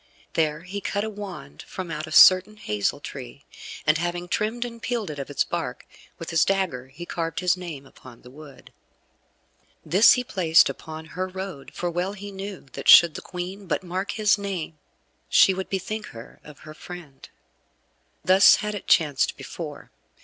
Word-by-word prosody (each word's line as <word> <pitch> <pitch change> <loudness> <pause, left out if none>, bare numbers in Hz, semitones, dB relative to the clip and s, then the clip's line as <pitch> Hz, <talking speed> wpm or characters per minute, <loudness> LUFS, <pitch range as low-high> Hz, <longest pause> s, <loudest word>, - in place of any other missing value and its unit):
There 155 -1 0
he 195 +3 -6
cut 205 +1 -2
a 220 - -4
wand 190 - -9
from 185 -3 -6
out 155 +1 -4
a - - -10
certain 185 +5 +7
hazel 105 - -2
tree, 140 -1 -9 0.4
and 155 0 +3
having 175 +1 -3
trimmed 220 +6 -1
and 235 -1 -9
peeled 225 -5 -3
it 145 - -8
of 140 - -6
its 145 - +1
bark, - - -5 0.3
with 165 - -7
his 165 - +4
dagger 185 -10 -1
he 170 +6 -10
carved 165 -2 -3
his 180 0 +2
name 165 -7 -8
upon 130 -3 -16
the 125 - -14
wood. 145 0 -14 1.1
This 195 +6 +6
he 250 - -1
placed 170 -8 +4
upon 160 0 -8
her 185 +1 -2
road, 185 -8 -7
for 175 -1 -2
well 180 +3 -2
he 205 0 -9
knew 195 0 -7
that - - -3
should 170 -2 +9
the - - -7
Queen 185 +2 -7
but 175 - -1
mark 185 +2 -3
his 215 -1 +2
name 180 -6 -5 0.5
she 190 - +6
would 190 0 -5
bethink 215 +3 -4
her 115 0 -12
of 150 0 -14
her 155 - -11
friend. 155 -4 -11 1.0
Thus 190 +2 +7
had 210 0 -3
it 205 - -7
chanced 150 -5 +2
before. - - -8
175 Hz, 180 wpm, -24 LUFS, 155-195 Hz, 1.1 s, should